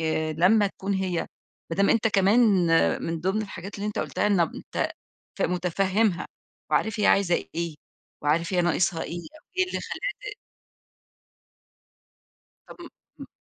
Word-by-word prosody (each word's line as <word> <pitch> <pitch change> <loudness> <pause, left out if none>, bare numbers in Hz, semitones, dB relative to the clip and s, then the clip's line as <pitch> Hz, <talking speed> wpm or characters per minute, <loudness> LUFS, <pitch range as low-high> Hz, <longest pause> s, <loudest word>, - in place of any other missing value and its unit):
آآ 160 -1 0
لمّا 195 +7 +4
تكون 195 0 -3
هي 185 -3 -1 0.4
ما 165 - -3
دام 200 +1 +4
أنت 225 -1 +3
كمان 200 +3 +4 0.6
من 165 -1 -3
ضِمن 190 +5 0
الحاجات 195 -1 -8
اللي 205 +1 -4
أنت 210 - -3
قُلتها - - -1
إنب 185 -6 +2
أنت - - -3 0.5
ف - - 0
مُتفهِّمها 185 +2 +1 0.4
وعارف 220 0 +1
هي 205 - +3
عايزة 190 -3 +4 0.2
إيه، 170 -1 -2 0.5
وعارف 160 +5 +1
هي 180 - +3
ناقصها 170 -1 +1
إيه 175 - -5
أو 310 - -14 0.2
إيه 370 - +5
اللي - - -3
خلّاها 415 -4 -5
ت - - -13 2.3
طب - - -12
م - - -8 0.4
م - - -13
190 Hz, 150 wpm, -26 LUFS, 170-210 Hz, 2.3 s, إيه